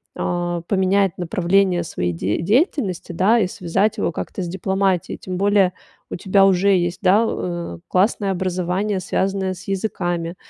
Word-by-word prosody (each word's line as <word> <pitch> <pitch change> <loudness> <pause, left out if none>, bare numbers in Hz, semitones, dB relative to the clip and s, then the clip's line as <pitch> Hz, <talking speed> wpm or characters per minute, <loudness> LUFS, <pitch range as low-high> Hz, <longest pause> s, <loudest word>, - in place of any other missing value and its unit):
а, 175 -1 -2
поменять 195 -1 +1
направление 180 +1 +1
своей 90 - -2
де 95 - -2
деятельности, 210 - 0
да, 205 +7 +3
и 200 - +2
связать 195 +5 -1
его 185 - 0
как-то 190 - -5
с - - -4
дипломатией. 190 0 -1
Тем 185 -1 -6
более 200 -2 +3 0.4
у - - -3
тебя 195 +1 +3
уже 195 +1 +3
есть, 175 -1 -1
да, 180 - 0
классное 195 +1 +1
образование, 185 +2 -1
связанное 190 +1 -1
с 185 - -12
языками. 175 -4 -2
185 Hz, 145 wpm, -21 LUFS, 175-195 Hz, 0.4 s, да